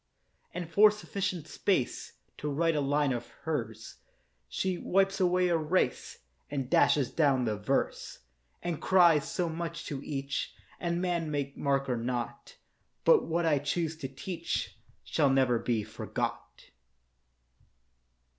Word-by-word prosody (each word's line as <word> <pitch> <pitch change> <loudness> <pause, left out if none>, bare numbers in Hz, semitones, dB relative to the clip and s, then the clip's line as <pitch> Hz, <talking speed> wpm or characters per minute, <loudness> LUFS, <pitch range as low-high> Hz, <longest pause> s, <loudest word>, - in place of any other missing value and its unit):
And 175 -1 -5
for 210 +6 +7
sufficient 190 -5 -3
space 170 -10 -1 0.3
To 150 - -3
write 165 +3 +1
a 150 - +1
line 145 0 +2
of 120 0 -4 0.2
hers, 115 -8 -4 0.5
She 185 - -1
wipes 195 +1 +1
away 180 0 +3
a 170 - +3
race 160 +4 0 0.3
And 135 -3 -3
dashes 140 -5 +4
down 140 -5 +2
the 110 -2 0
verse, 105 +7 -1 0.5
And 170 -3 -3
cries, 170 -6 +5
'So 180 -2 -1
much 165 0 -4
to 140 -3 -4
each, 140 -1 -3 0.2
And 170 0 -1
man 170 -3 -1
may 140 -2 -2
mark 140 -1 0
or 125 -2 0
not; 120 - -4 0.5
But 475 -4 +6
what 170 +1 0
I 150 -3 +3
choose 160 +3 -1
to 145 -4 -4
teach 165 +6 -4 0.3
Shall 140 - +2
never 130 -3 +3
be 115 -2 0
forgot. - - -5
150 Hz, 135 wpm, -30 LUFS, 135-175 Hz, 0.5 s, for